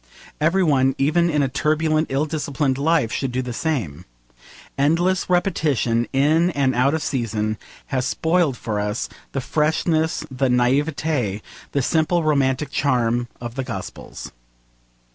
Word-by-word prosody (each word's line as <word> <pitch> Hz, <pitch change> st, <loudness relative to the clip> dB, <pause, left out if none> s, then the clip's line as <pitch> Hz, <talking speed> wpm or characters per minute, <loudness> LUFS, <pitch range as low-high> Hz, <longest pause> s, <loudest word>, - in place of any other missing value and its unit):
Every 170 Hz, +5 st, +2 dB
one, 135 Hz, -5 st, +3 dB
even 170 Hz, +5 st, +2 dB
in 150 Hz, -3 st, +2 dB
a -, -, +2 dB
turbulent, 155 Hz, +3 st, +1 dB
ill 135 Hz, +3 st, +1 dB
disciplined 145 Hz, -3 st, -1 dB
life, 150 Hz, -6 st, +2 dB
should 135 Hz, -2 st, -2 dB
do 130 Hz, +1 st, -1 dB
the 125 Hz, -1 st, -5 dB
same. 105 Hz, -, -2 dB, 0.7 s
Endless 170 Hz, +7 st, +1 dB
repetition, 150 Hz, -, +1 dB
in 155 Hz, +6 st, +3 dB
and 140 Hz, -5 st, +1 dB
out 130 Hz, +5 st, +2 dB
of 160 Hz, -, -2 dB
season, 110 Hz, -4 st, -2 dB, 0.3 s
has 130 Hz, -2 st, -1 dB
spoiled 160 Hz, -5 st, +1 dB
for 105 Hz, -3 st, -3 dB
us 105 Hz, +2 st, -2 dB, 0.2 s
the 135 Hz, -, -1 dB
freshness, 155 Hz, +3 st, 0 dB
the 130 Hz, 0 st, 0 dB
naivete, 125 Hz, -3 st, +1 dB, 0.3 s
the 140 Hz, -, 0 dB
simple 160 Hz, +4 st, +1 dB
romantic 140 Hz, -2 st, +1 dB
charm 120 Hz, -3 st, +1 dB
of 120 Hz, -1 st, -6 dB
the 135 Hz, +1 st, -3 dB
Gospels. 125 Hz, -3 st, -7 dB
140 Hz, 140 wpm, -22 LUFS, 125-160 Hz, 0.7 s, one